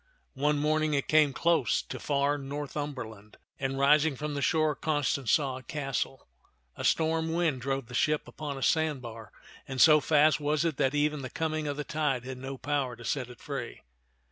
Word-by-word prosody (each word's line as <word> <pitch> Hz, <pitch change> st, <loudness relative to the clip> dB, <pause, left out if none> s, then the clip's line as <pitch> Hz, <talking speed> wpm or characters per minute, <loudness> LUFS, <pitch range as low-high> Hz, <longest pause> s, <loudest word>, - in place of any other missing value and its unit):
One 145 Hz, +2 st, +1 dB
morn 155 Hz, +2 st, +1 dB
ing 155 Hz, -1 st, 0 dB
it 140 Hz, -, -1 dB
came 155 Hz, -2 st, +4 dB
close 170 Hz, +4 st, +2 dB
to -, -, -7 dB
far 145 Hz, 0 st, 0 dB
Northumberland, 135 Hz, -6 st, -6 dB, 0.2 s
and 135 Hz, 0 st, -2 dB
rising 145 Hz, +2 st, +4 dB
from 150 Hz, +3 st, -4 dB
the 140 Hz, -, -3 dB
shore 155 Hz, +1 st, +2 dB
Constance 145 Hz, -4 st, 0 dB
saw 135 Hz, -4 st, +1 dB
a -, -, -13 dB
castle. 135 Hz, -1 st, -4 dB, 0.5 s
A -, -, -6 dB
storm 160 Hz, 0 st, +1 dB
wind 165 Hz, -7 st, 0 dB
drove 135 Hz, 0 st, -2 dB
the 125 Hz, -, -13 dB
ship 150 Hz, +5 st, +1 dB
upon 145 Hz, -3 st, -6 dB
a 135 Hz, -, -5 dB
sandbar, 125 Hz, -9 st, -1 dB, 0.4 s
and 135 Hz, -1 st, -5 dB
so 155 Hz, +3 st, +8 dB
fast 150 Hz, 0 st, +4 dB
was 150 Hz, +2 st, 0 dB
it 160 Hz, -4 st, -1 dB
that 135 Hz, +2 st, +1 dB
even 150 Hz, 0 st, +1 dB
the 130 Hz, -, -5 dB
coming 155 Hz, 0 st, -2 dB
of 145 Hz, 0 st, -3 dB
the 150 Hz, -, -2 dB
tide 145 Hz, -5 st, -1 dB
had 130 Hz, -1 st, -6 dB
no 135 Hz, +1 st, -6 dB
power 140 Hz, -3 st, -1 dB
to 120 Hz, -, -12 dB
set 130 Hz, -4 st, -2 dB
it 125 Hz, -, -12 dB
free. -, -, -6 dB
145 Hz, 195 wpm, -29 LUFS, 135-155 Hz, 0.5 s, so